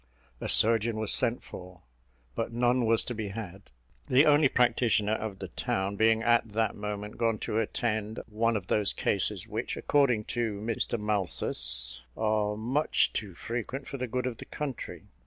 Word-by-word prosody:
A -, -, -4 dB
surgeon 115 Hz, 0 st, +4 dB
was 110 Hz, -1 st, +2 dB
sent 120 Hz, +1 st, +1 dB
for, 90 Hz, -1 st, -11 dB, 0.5 s
but 115 Hz, -, -3 dB
none 120 Hz, 0 st, +2 dB
was 115 Hz, 0 st, +3 dB
to 125 Hz, -, -3 dB
be 110 Hz, -2 st, -4 dB
had; 100 Hz, -2 st, -8 dB, 0.4 s
the 135 Hz, +4 st, +6 dB
only 145 Hz, -1 st, +5 dB
practitioner 115 Hz, -4 st, +2 dB
of 110 Hz, -3 st, -3 dB
the 95 Hz, -2 st, -7 dB
town 95 Hz, +4 st, -2 dB
being 110 Hz, +1 st, +3 dB
at 120 Hz, 0 st, +4 dB
that 110 Hz, -1 st, +1 dB
moment 105 Hz, 0 st, -5 dB
gone 115 Hz, -2 st, +1 dB
to 110 Hz, -, 0 dB
attend 110 Hz, -1 st, -2 dB
one 115 Hz, +1 st, 0 dB
of 95 Hz, -, -6 dB
those 105 Hz, +1 st, 0 dB
cases 100 Hz, 0 st, -1 dB
which, 110 Hz, +2 st, -3 dB
according 130 Hz, -7 st, +2 dB
to 115 Hz, -4 st, -1 dB
Mr 115 Hz, +1 st, -1 dB
Malthus, 65 Hz, -, 0 dB, 0.2 s
are 105 Hz, -1 st, 0 dB
much 130 Hz, +8 st, +1 dB
too 100 Hz, -5 st, -4 dB
frequent 120 Hz, +6 st, -5 dB
for 140 Hz, -, -5 dB
the 130 Hz, -1 st, -3 dB
good 125 Hz, +2 st, -2 dB
of 125 Hz, -3 st, -3 dB
the -, -, -9 dB
country. 145 Hz, -5 st, -6 dB
110 Hz, 170 wpm, -29 LUFS, 105-120 Hz, 0.5 s, the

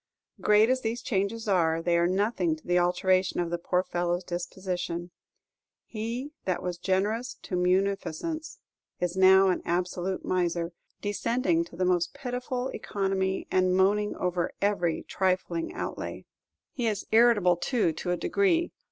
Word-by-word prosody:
Great 210 Hz, +1 st, +5 dB
as 255 Hz, +1 st, +1 dB
these 230 Hz, +1 st, -3 dB
changes 215 Hz, +2 st, -1 dB
are, 165 Hz, -4 st, +2 dB
they 170 Hz, +1 st, +1 dB
are 170 Hz, 0 st, +3 dB
nothing 190 Hz, -3 st, +1 dB
to 155 Hz, -, -18 dB
the 175 Hz, 0 st, +3 dB
alteration 185 Hz, +1 st, +2 dB
in 175 Hz, -1 st, 0 dB
the 175 Hz, 0 st, -2 dB
poor 180 Hz, +1 st, +1 dB
fellow's 175 Hz, 0 st, -1 dB
disposition. 175 Hz, -1 st, -4 dB, 0.7 s
He 235 Hz, +6 st, -4 dB
that 185 Hz, -2 st, -1 dB
was 180 Hz, -1 st, -3 dB
generous 215 Hz, +7 st, 0 dB
to 185 Hz, -, -4 dB
munificence 195 Hz, -, -1 dB, 0.4 s
is 180 Hz, 0 st, -1 dB
now 190 Hz, 0 st, +6 dB
an 180 Hz, -, 0 dB
absolute 180 Hz, +1 st, -2 dB
miser, 175 Hz, -2 st, 0 dB, 0.3 s
descending 205 Hz, -4 st, +1 dB
to 170 Hz, -, -14 dB
the 185 Hz, +2 st, 0 dB
most 180 Hz, -1 st, +1 dB
pitiful 250 Hz, 0 st, -3 dB
economy 190 Hz, -1 st, -1 dB
and 185 Hz, 0 st, +3 dB
moaning 210 Hz, +2 st, +2 dB
over 180 Hz, -1 st, -1 dB
every 195 Hz, -5 st, 0 dB
trifling 185 Hz, -3 st, -1 dB
outlay. -, -, -5 dB, 0.5 s
He 240 Hz, -3 st, -1 dB
is 210 Hz, -3 st, -2 dB
irritable, 220 Hz, -6 st, +5 dB
too, 215 Hz, -4 st, +1 dB
to 175 Hz, -, -5 dB
a 180 Hz, -, +1 dB
degree. 345 Hz, -, +1 dB
185 Hz, 145 wpm, -28 LUFS, 175-215 Hz, 0.7 s, now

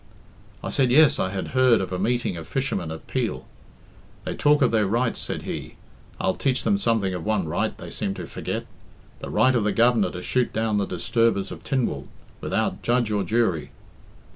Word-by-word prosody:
I -, -, -3 dB
said, 130 Hz, -2 st, +2 dB
'Yes, 150 Hz, +4 st, +6 dB
I 95 Hz, -, +1 dB
had 95 Hz, 0 st, -4 dB
heard 130 Hz, -3 st, +4 dB
of 95 Hz, -, -3 dB
a 90 Hz, -, -2 dB
meeting 120 Hz, 0 st, 0 dB
of 80 Hz, -1 st, -8 dB
fishermen 125 Hz, -11 st, -2 dB
at 80 Hz, 0 st, -7 dB
Peel.' -, -, -2 dB, 0.8 s
'They -, -, -3 dB
talk 150 Hz, 0 st, +3 dB
of 125 Hz, -, +3 dB
their 110 Hz, -3 st, +2 dB
rights,' 115 Hz, +3 st, 0 dB
said -, -, -3 dB
he; -, -, -6 dB, 0.4 s
'I'll 95 Hz, -1 st, +1 dB
teach 130 Hz, +3 st, 0 dB
them 200 Hz, -1 st, +2 dB
something 110 Hz, -, +1 dB
of 90 Hz, -3 st, -4 dB
one 105 Hz, -6 st, 0 dB
right 75 Hz, -, -1 dB
they -, -, -9 dB
seem 95 Hz, -, -2 dB
to 90 Hz, -, -6 dB
forget -, -, -4 dB, 0.5 s
the -, -, -7 dB
right 130 Hz, 0 st, +3 dB
of 120 Hz, -4 st, +2 dB
the 105 Hz, -, +1 dB
Governor 115 Hz, -4 st, +3 dB
to 90 Hz, 0 st, -7 dB
shoot 125 Hz, -1 st, 0 dB
down 110 Hz, -2 st, 0 dB
the 100 Hz, -, -1 dB
disturbers 100 Hz, +2 st, 0 dB
of -, -, -9 dB
Tynwald, 115 Hz, -, -1 dB, 0.3 s
without 95 Hz, -, -1 dB
judge 120 Hz, +1 st, +1 dB
or 105 Hz, -1 st, +1 dB
jury.' 95 Hz, -5 st, 0 dB
110 Hz, 195 wpm, -24 LUFS, 95-125 Hz, 0.8 s, Yes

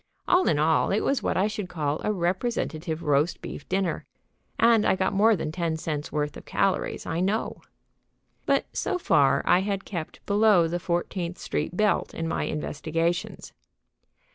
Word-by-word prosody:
All 360 Hz, +1 st, +4 dB
in 150 Hz, -, +3 dB
all, 155 Hz, +2 st, +2 dB
it 205 Hz, -, +1 dB
was 275 Hz, -, 0 dB
what -, -, -1 dB
I 190 Hz, -, +3 dB
should 210 Hz, -3 st, -3 dB
call 150 Hz, -3 st, -2 dB
a 215 Hz, -, +1 dB
representative 175 Hz, -4 st, -2 dB
roast 145 Hz, +3 st, +1 dB
beef -, -, -8 dB
dinner. 190 Hz, -2 st, -1 dB, 0.5 s
And 230 Hz, -2 st, +5 dB
I -, -, +3 dB
got 190 Hz, +1 st, 0 dB
more 215 Hz, +3 st, +4 dB
than 155 Hz, -4 st, -3 dB
ten 165 Hz, -1 st, -2 dB
cents' 155 Hz, -2 st, -4 dB
worth 150 Hz, -1 st, -2 dB
of -, -, -10 dB
calories, 195 Hz, -1 st, -1 dB
I 165 Hz, -, -2 dB
know. 200 Hz, +5 st, -1 dB, 0.9 s
But -, -, +2 dB
so -, -, -1 dB
far 145 Hz, -, +3 dB
I 180 Hz, -, +5 dB
had 195 Hz, 0 st, -2 dB
kept 170 Hz, -5 st, -6 dB
below 205 Hz, -4 st, +4 dB
the 175 Hz, +2 st, -2 dB
Fourteenth 175 Hz, 0 st, -2 dB
Street 165 Hz, +4 st, -3 dB
belt 210 Hz, -1 st, +1 dB
in 165 Hz, -, -3 dB
my 165 Hz, -, -1 dB
investigations. 165 Hz, +3 st, -2 dB
175 Hz, 165 wpm, -26 LUFS, 160-200 Hz, 0.9 s, And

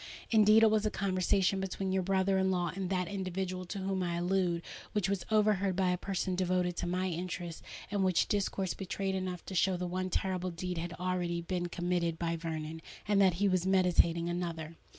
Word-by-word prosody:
Indeed, 215 Hz, 0 st, +6 dB
it 220 Hz, -, +6 dB
was 215 Hz, -1 st, +2 dB
a 215 Hz, -, +2 dB
conversation 195 Hz, 0 st, +1 dB
between 190 Hz, 0 st, -2 dB
your 190 Hz, 0 st, +2 dB
brother 190 Hz, +1 st, +2 dB
in 190 Hz, 0 st, +2 dB
law 175 Hz, -2 st, 0 dB
and 190 Hz, -2 st, -3 dB
that 180 Hz, -2 st, 0 dB
individual 185 Hz, -1 st, -3 dB
to 200 Hz, -, -6 dB
whom 190 Hz, 0 st, -1 dB
I 175 Hz, -1 st, -1 dB
allude, 175 Hz, -1 st, 0 dB, 0.3 s
which 205 Hz, -3 st, +1 dB
was 195 Hz, -2 st, -2 dB
overheard 210 Hz, -3 st, +2 dB
by 185 Hz, -1 st, +2 dB
a 180 Hz, -, 0 dB
person 190 Hz, -1 st, -2 dB
devoted 180 Hz, -1 st, 0 dB
to -, -, -2 dB
my 180 Hz, +1 st, 0 dB
interests, 175 Hz, -1 st, -4 dB, 0.3 s
and 200 Hz, -1 st, +1 dB
which 185 Hz, -2 st, +3 dB
discourse 195 Hz, -2 st, -1 dB
betrayed 195 Hz, 0 st, -3 dB
enough 185 Hz, -2 st, -3 dB
to -, -, -7 dB
show 185 Hz, 0 st, +2 dB
that 180 Hz, -, -3 dB
one 185 Hz, +1 st, -2 dB
terrible 185 Hz, 0 st, -1 dB
deed 180 Hz, 0 st, -4 dB
had 170 Hz, +1 st, -4 dB
already 175 Hz, -1 st, -1 dB
been 175 Hz, +1 st, -2 dB
committed 175 Hz, -1 st, -1 dB
by 170 Hz, 0 st, -1 dB
Vernon, 160 Hz, -1 st, -5 dB, 0.3 s
and 200 Hz, -1 st, +4 dB
that 185 Hz, -3 st, +5 dB
he 200 Hz, +3 st, +2 dB
was 185 Hz, -1 st, +1 dB
meditating 175 Hz, -3 st, +3 dB
another." 170 Hz, -2 st, -3 dB
185 Hz, 200 wpm, -32 LUFS, 175-195 Hz, 0.3 s, Indeed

